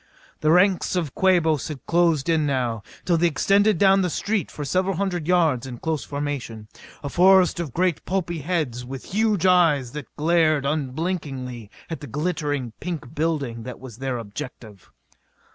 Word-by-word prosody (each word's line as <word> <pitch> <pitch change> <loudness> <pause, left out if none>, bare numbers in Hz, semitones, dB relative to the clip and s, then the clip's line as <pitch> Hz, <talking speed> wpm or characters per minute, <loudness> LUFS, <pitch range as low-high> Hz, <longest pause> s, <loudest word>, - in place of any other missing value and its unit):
The 155 - +1
ranks 180 +2 +3
of 165 -7 -2
Quabos 170 -6 +2
had 145 -5 -8
closed 165 -4 +2
in 160 -3 +2
now, 125 -5 -1 0.2
till 170 -2 +2
they 175 - +4
extended 200 +6 +3
down 195 +2 +5
the 180 - 0
street 205 +3 -1
for 145 - -6
several 185 +6 0
hundred 175 -4 -2
yards 160 -8 +2
in 125 -2 -7
close 160 +2 -2
formation 140 -7 -5 0.4
a - - -3
forest 185 +2 +5
of 165 -6 -3
great 180 +3 0
pulpy 175 -3 -2
heads 145 -6 -2
with 130 +6 -8
huge 210 -3 +2
eyes 165 -9 +4
that 145 -4 -7
glared 155 -2 +2
unblinkingly 140 - -3 0.2
at 165 - -5
the 145 - -8
glittering, 145 -3 -2
pink 155 -7 -5
building 145 -7 -1
that 125 +2 -8
was 125 -3 -11
their 130 -2 -2
objective. 110 - -9
155 Hz, 160 wpm, -23 LUFS, 130-180 Hz, 0.4 s, down